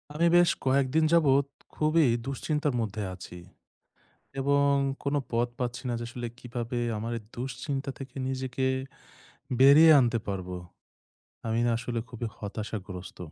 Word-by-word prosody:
আমি 170 +2 +3
বেশ 175 -1 +5 0.2
কয়েকদিন 135 +3 +3
যাবত, 140 -4 +4 0.3
খুবই 155 -1 +3 0.2
দুশ্চিন্তার 150 +1 -1
মধ্যে 105 -1 -3
আছি 90 -1 -10 1.0
এবং 140 +1 +3 0.3
কোন 140 +1 0 0.2
পথ 120 +1 +1
পাচ্ছি 125 -1 -3
না - - 0
যে - - -4
আসলে 120 0 -5
কিভাবে 120 -1 -4 0.2
আমার 115 +2 -4
এই 115 - -9
দুশ্চিন্তা 135 +3 -4
থেকে 135 -2 -9
নিজেকে, 130 0 -2 0.9
বেরিয়ে 145 +5 +8
আনতে 120 -2 +2
পারবো। 95 -2 -4 0.9
আমি 115 +1 +1
না - - +2
আসলে 120 0 -3
খুবই 120 0 -5
হতাশাগ্রস্ত। 100 -4 -6
125 Hz, 130 wpm, -28 LUFS, 115-140 Hz, 1.0 s, বেরিয়ে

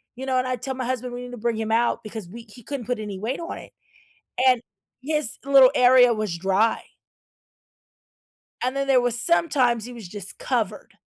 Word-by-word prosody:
you 260 +2 -6
know, 260 -1 0
and 255 0 0
I 255 - 0
tell 265 +3 -5
my 255 -1 -4
husband 250 0 -3
we 245 0 -6
need 245 - -9
to 245 - -7
bring 235 +1 -1
him 220 0 -3
out 235 +1 +2
because 215 -3 -7
we 230 +5 -10
he 240 +3 -14
couldn't 275 0 -5
put 250 -2 -1
any 205 -3 -6
weight 230 +7 -3
on 335 - -6
it, - - -12 0.8
and 250 -2 +4 0.4
his 300 -2 -2
little 270 -2 +7
area 250 -1 +6
was 215 -6 -3
dry. 195 +5 +1 1.8
And 255 +2 -1
then 275 0 -1
there 260 -2 +4
was 245 -1 -1
sometimes 255 -7 +2
he 245 - -9
was 230 -6 -9
just 195 0 -7
covered, 215 -6 -2
245 Hz, 200 wpm, -24 LUFS, 220-255 Hz, 1.8 s, little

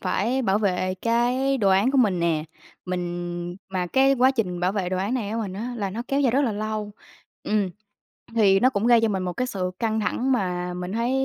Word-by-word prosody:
phải 255 +5 0
bảo 200 -3 +2
vệ 185 -2 0
cái 250 +4 +1
đồ 200 - +2
án 195 +7 +4
của 275 - +2
mình 195 -8 +3
nè. 165 -2 +1 0.4
Mình 175 -1 -4
mà 185 -2 -2
cái 265 +8 +4
quá 260 +1 +4
trình 190 -9 -2
bảo 180 +2 +1
vệ 195 -4 -1
đồ 185 - -1
án 200 +7 -1
này 215 -5 -2
của 225 - -2
mình 205 -4 -3
á 230 +6 -5
là 200 -4 -2
nó 225 +5 -4
kéo 275 +1 +1
dài 265 -4 +3
rất 270 +4 +2
là 240 -6 0
lâu. 215 0 -3 0.5
Ừm, 205 -3 0 0.7
thì 195 -4 +5
nó 255 - +5
cũng 225 -2 0
gây 235 -2 +6
cho 225 - +3
mình 190 -3 -1
một 180 -1 -3
cái 250 +7 -2
sự 185 -6 -3
căng 220 -1 0
thẳng 245 +5 0
mà 180 -6 -1
mình 180 +1 -5
thấy 235 +2 0
210 Hz, 235 wpm, -24 LUFS, 185-240 Hz, 0.7 s, gây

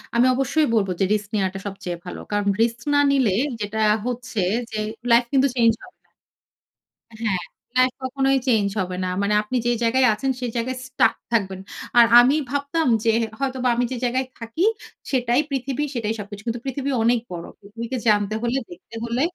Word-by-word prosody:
আমি 235 +1 +5
অবশ্যই 280 +4 +1
বলবো 195 -4 +1
যে, - - +3
"রিস্ক 210 -1 -2
নেওয়াটা 195 -1 -1
সবচেয়ে 185 -3 -5
ভালো।" 180 - -7
কারণ, 205 -1 0 0.2
রিস্ক 230 0 -1
না 285 - +5
নিলে 265 -7 +3 0.3
যেটা 210 +1 -3 0.3
হচ্ছে 250 -2 -4 0.3
যে 215 - -4 0.3
লাইফ 235 +1 +6
কিন্তু 270 0 +4
চেঞ্জ 230 -2 +4
হবে 370 - -16
না। - - -41 1.1
হ্যাঁ, 190 -5 0 0.4
লাইফ 255 0 +4
কখনোই 270 +1 +1
চেঞ্জ 220 -5 +3
হবে 185 -1 -2
না। - - -1
মানে 200 +1 +1
আপনি 235 +5 -5
যে - - +3
জায়গায় 255 +3 +3
আছেন 265 +6 -1
সেই 245 - -2
জায়গায় 255 +2 -2
stuck 255 - +2 0.2
থাকবেন। 190 -4 0 0.4
আর 235 - +9
আমি 255 +4 +5 0.2
ভাবতাম 285 +3 0 0.2
যে 225 - +5
হে 225 - -1
হয়তোবা 260 -2 0
আমি 245 - +1
যে 255 - -2
জায়গায় 255 +2 0
থাকি, 230 +9 -3 0.5
সেটাই 250 -1 +2
পৃথিবী, 270 +1 -2
সেটাই 225 -2 -1
সবকিছু। 205 0 -8
কিন্তু 230 0 -2
পৃথিবী 275 +1 -2
অনেক 235 +1 +3
বড়। 170 -1 -5 0.2
পৃথিবীকে 230 +5 -6
জানতে 205 0 +2
হলে, 240 +2 0
দেখতে 175 +6 -12
হলে 235 +2 -1
235 Hz, 180 wpm, -23 LUFS, 210-260 Hz, 1.1 s, আর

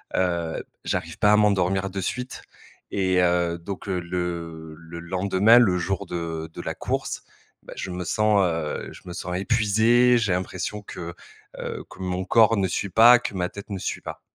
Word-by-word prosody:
heu, 85 -3 -1 0.2
j'arrive - - -3
pas 105 - +5
à - - +6
m'endormir 95 -2 +2
de 95 0 -4
suite. 125 +6 -4 0.5
Et, 95 -2 +1
heu, 85 -1 +2
donc, 100 +3 -7
heu, 90 -1 0
le 85 -2 -5
le 80 +1 -10
lendemain, 95 +5 +4
le 95 -7 +4
jour 90 +2 -2
de 80 -2 -4
de - - -7
la - - -4
course, - - -3 0.4
bah - - -10
je 95 - -4
me 90 0 -4
sens, 105 0 +2
heu, 80 -3 -2
je - - -13
me 90 - -7
sens 90 0 -4
épuisé, 115 +4 +4
j'ai 105 -5 +1
l'impression 95 +3 -3
que 85 -2 -7 0.4
heu, - - -5
que - - -14
mon 90 0 -2
corps 115 +1 +5
ne 95 -1 +2
suit 95 +3 -2
pas, 120 +2 +8
que 115 - -5
ma 90 -1 -1
tête 100 +1 -10
ne 95 - -3
suit - - -4
pas. - - -8
95 Hz, 190 wpm, -24 LUFS, 85-105 Hz, 0.5 s, pas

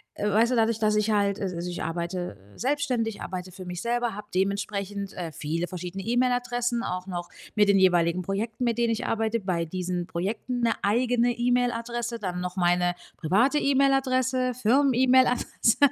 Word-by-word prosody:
äh, 210 - -1
weißt 225 +4 +3
du, - - +2
dadurch, 225 0 +2
dass 215 -1 +2
ich 210 +1 +1
halt 200 -1 +1
al 190 -2 -2
also, 170 +1 -4
ich 175 - -5
arbeite, 170 - -3 0.2
äh, - - -17
selbstständig, 250 -5 -1
arbeite 185 -1 -6
für 185 - -9
mich 180 0 -5
selber, 240 0 0
habe 210 +1 -8
dementsprechend, 200 +1 -2
äh, 170 -3 -5
viele 160 +4 -3
verschiedene 180 +2 -6
E-Mail-Adressen, 245 0 0
auch 180 +1 -4
noch 175 -2 -5 0.3
mit 210 -1 +4
den 200 -1 +5
jeweiligen 175 -1 +3
Projekten, 215 +6 -2
mit 235 -1 0
denen 235 -1 +2
ich 225 - -2
arbeite. 225 +1 0
Bei 185 -4 -1
diesen 180 +1 -3
Projekten 210 +8 -3
'ne 230 -1 +3
eigene 240 +3 +2
E-Mail-Adresse, 240 -1 -1
dann 180 -3 -3
noch 180 +1 -5
meine 175 0 +2 0.2
private 230 - +2
E-Mail-Adresse, 260 -2 +2
Firmen-E-Mail-Adresse. 255 -1 +3
210 Hz, 170 wpm, -26 LUFS, 180-240 Hz, 0.3 s, den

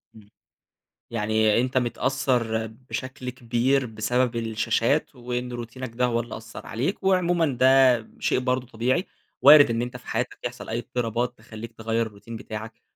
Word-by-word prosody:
إمم، 105 -2 -16 0.8
يعني 110 0 +2
أنت 130 +1 -1
متأثّر 120 -3 0 0.2
بشكل 130 -1 -5
كبير 125 +2 +1
بسبب 120 +2 0
الشاشات، 115 +5 0
وإن 125 0 -4
روتينك 120 +1 -6
ده 125 0 +2
هو 120 -1 +1
اللي 120 +1 -5
أثّر 115 - -10
عليك، 145 - -2
وعمومًا 175 -3 +3
ده 130 -3 +5
شيء - - +1
برضه 125 -1 -1
طبيعي، 130 - 0 0.4
وارد 145 -1 +9
إن 115 0 0
أنت 125 +1 -4
في 125 - -18
حياتك - - -2
يحصل - - -6
أي 115 - -1
اضطرابات 120 +1 -2
تخلّيك 110 +1 -9
تغيّر 115 0 -1
الRoutine 100 0 -18
بتاعَك، 110 0 -7
120 Hz, 150 wpm, -25 LUFS, 115-130 Hz, 0.8 s, وارد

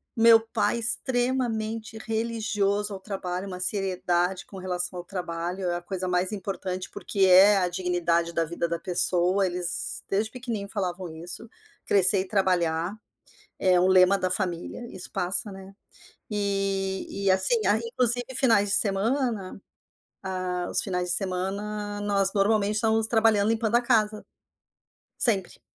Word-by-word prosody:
meu 230 -1 +6
pai 225 +1 -1
extremamente 235 -2 -1
religioso 215 -2 -2
ao 195 - -7
trabalho, 190 -1 -5
uma 180 -2 -7
seriedade 185 -1 0
com 195 - -12
relação 180 -1 -1
ao 175 - -9
trabalho, 180 0 -5
é 175 - -1
a 175 - -8
coisa 185 0 -4
mais 180 +2 0
importante, 190 -2 -5
porque 200 - -5
é 190 +3 +6
a 185 -2 +1
dignidade 175 -2 -1
da 165 -1 0
vida 170 +1 -3
da 170 - -2
pessoa. 180 +2 +3
Eles 180 0 -1
desde 210 +3 -1
pequeninho 230 -5 -6
falavam 185 -3 -4
isso, 175 +7 -3 0.4
crescer 195 0 +4
e 185 - -3
trabalhar 180 -3 0 0.6
é 185 -1 +3
o 180 - +3
lema 185 +1 +5
da 185 -1 -2
família 180 +4 -1
e - - -12
isso 180 - -4
passa, 180 +4 +1
né. 195 0 -12 0.6
E 195 -1 -2
e - - +4
assim, 190 +4 +2
a 205 +2 +3
inclusive 240 +1 +2
finais 225 -6 +3
de - - +3
semana 210 -1 0 0.6
ah, 185 -2 -4
os - - +3
finais 180 -2 -3
de 175 - +4
semana 205 +2 -2
nós 200 -1 +1
normalmente 205 0 +1
estávamos 220 0 +3
trabalhando 220 -2 +2
limpando 225 0 -1
a 240 - +2
casa. 215 -3 +1 0.9
Sempre. 200 -7 +1
195 Hz, 145 wpm, -25 LUFS, 180-215 Hz, 0.9 s, meu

